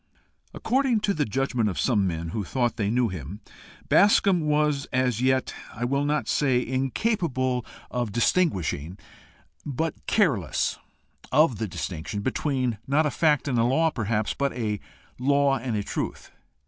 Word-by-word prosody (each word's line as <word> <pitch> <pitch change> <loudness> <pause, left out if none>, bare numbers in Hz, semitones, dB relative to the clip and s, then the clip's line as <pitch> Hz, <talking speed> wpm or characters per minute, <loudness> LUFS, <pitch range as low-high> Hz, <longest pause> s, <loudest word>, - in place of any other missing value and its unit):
According 255 -2 +1
to 205 -1 +1
the 150 -4 0
judgment 125 -2 0
of 95 - -4
some 105 -7 +2
men 85 -1 -3
who 105 +5 -3
thought 120 +4 -1
they 105 -2 -1
knew 120 +1 +2
him, 90 +2 -7 0.5
Bascombe 195 -4 +4
was 150 -2 +1
as 125 -3 +1
yet 130 0 +1 0.2
I 120 - -2
will 140 +3 0
not 150 +1 0
say 130 -4 +2
incapable 130 - 0 0.3
of 120 -4 -2
distinguishing, 95 - 0 0.7
but 155 +3 -2
careless 130 - +1 0.5
of 135 -6 +3
the 110 - -1
distinction 90 +2 -5
between 130 -2 -1
not 150 +3 +3
a 150 - 0
fact 150 0 +2
and 125 -4 +1
a - - +4
law, 160 +7 +2
perhaps, 110 -4 -1
but 140 0 -1
a 110 -4 -2 0.4
law 140 0 +2
and 120 -1 -3
a 105 - -1
truth. - - -5
130 Hz, 150 wpm, -25 LUFS, 110-150 Hz, 0.7 s, Bascombe